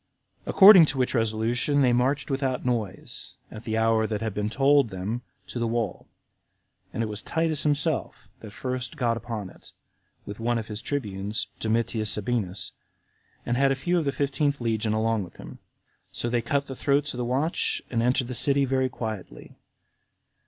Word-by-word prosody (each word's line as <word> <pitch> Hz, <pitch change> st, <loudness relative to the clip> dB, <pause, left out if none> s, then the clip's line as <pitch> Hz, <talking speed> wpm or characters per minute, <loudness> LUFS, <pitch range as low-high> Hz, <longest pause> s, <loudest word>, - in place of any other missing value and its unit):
34. -, -, -2 dB
According 190 Hz, -4 st, +10 dB
to 135 Hz, -, -2 dB
which 125 Hz, -1 st, 0 dB
resolution 120 Hz, +5 st, +1 dB
they 125 Hz, -2 st, +4 dB
marched 135 Hz, +4 st, +1 dB
without 135 Hz, -2 st, -1 dB
noise, 110 Hz, -6 st, -3 dB, 0.2 s
at 110 Hz, -, -10 dB
the 110 Hz, -1 st, -1 dB
hour 110 Hz, 0 st, +2 dB
that 105 Hz, -2 st, -2 dB
had 110 Hz, -1 st, -3 dB
been 105 Hz, +1 st, -2 dB
told 135 Hz, +1 st, +3 dB
them, 100 Hz, +5 st, -4 dB, 0.2 s
to 120 Hz, -, -6 dB
the 115 Hz, -, 0 dB
wall; 115 Hz, -4 st, -2 dB, 0.8 s
and 115 Hz, -, -2 dB
it -, -, 0 dB
was 105 Hz, -1 st, -5 dB
Titus 160 Hz, -2 st, 0 dB
himself 150 Hz, 0 st, 0 dB
that 110 Hz, -, -10 dB
first 130 Hz, +5 st, -4 dB
got 120 Hz, -4 st, +1 dB
upon 110 Hz, -4 st, -5 dB
it, -, -, -16 dB, 0.5 s
with 105 Hz, +1 st, -8 dB
one 120 Hz, +1 st, 0 dB
of 110 Hz, -1 st, -5 dB
his 105 Hz, 0 st, -5 dB
tribunes, 105 Hz, -5 st, -2 dB
Domitius 110 Hz, -1 st, 0 dB
Sabinus, 105 Hz, -3 st, -1 dB, 0.7 s
and 120 Hz, -, 0 dB
had 135 Hz, 0 st, +3 dB
a -, -, +2 dB
few 175 Hz, +7 st, 0 dB
of 160 Hz, -, -2 dB
the 140 Hz, -, +1 dB
fifteenth 140 Hz, +1 st, 0 dB
legion 110 Hz, -2 st, -1 dB
along 110 Hz, -1 st, +1 dB
with 85 Hz, -, -13 dB
him. -, -, -11 dB, 0.5 s
So 120 Hz, -, -2 dB
they 120 Hz, -1 st, +1 dB
cut 140 Hz, +4 st, -1 dB
the 135 Hz, -, -7 dB
throats 140 Hz, +2 st, +1 dB
of 125 Hz, -, -6 dB
the -, -, 0 dB
watch, 135 Hz, +7 st, 0 dB
and 115 Hz, -2 st, +1 dB
entered 125 Hz, +2 st, +2 dB
the 125 Hz, -, -6 dB
city 140 Hz, +2 st, +3 dB
very 130 Hz, 0 st, +1 dB
quietly. 110 Hz, -, -7 dB
120 Hz, 180 wpm, -26 LUFS, 110-135 Hz, 0.8 s, According